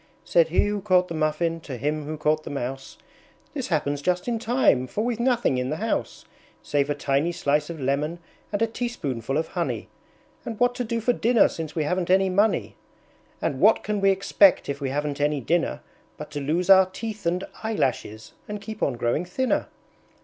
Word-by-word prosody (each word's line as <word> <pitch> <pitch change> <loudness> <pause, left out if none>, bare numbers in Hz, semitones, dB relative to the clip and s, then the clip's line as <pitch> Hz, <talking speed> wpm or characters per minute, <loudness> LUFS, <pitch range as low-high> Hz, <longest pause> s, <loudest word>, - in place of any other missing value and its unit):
Said 165 +9 +4
he 170 +5 +2
who 205 0 -2
caught 185 -2 +3
the - - -4
Muffin 160 +1 0
to 140 -5 -7
him 150 +4 -2
who 155 +1 -5
caught 155 +1 +1
the - - -7
Mouse, 135 0 -5 0.6
"This 270 -4 -3
happens 145 -4 -1
just 180 +5 0
in 235 -2 0
time! 220 - +2
For 205 - -2
we've 240 -1 -1
nothing 240 - +2
in 125 +1 -2
the 155 - -1
house, 225 +7 -3 0.4
Save 145 -1 0
a 145 - 0
tiny 140 +3 0
slice 150 -2 0
of 165 -2 -6
lemon 145 +5 -1 0.3
and 205 +2 0
a - - +5
teaspoonful 145 - -3
of 160 +1 -1
honey, - - -3 0.5
And 225 -3 -6
what 245 0 +3
to 245 - -3
do 230 0 -2
for 245 +3 +2
dinner 235 -1 +4
since 160 -2 -6
we 160 - +1
haven't 180 +3 -1
any 190 0 +4
money? 205 +4 +1 0.7
And - - -1
what - - +5
can 210 -1 -2
we 195 - +5
expect 195 0 +4
if 140 0 -4
we 135 - -1
haven't 145 +1 -2
any 145 0 +1
dinner, 165 +7 0 0.4
But 150 0 -8
to 145 - -4
lose 165 +6 0
our 190 -1 +7
teeth 210 0 -6
and 180 +2 0 0.2
eyelashes 130 - -2
and 210 0 -5
keep 215 +1 -8
on 135 - +1
growing 120 +6 0
thinner?" 255 +9 -1
170 Hz, 200 wpm, -25 LUFS, 145-210 Hz, 0.7 s, our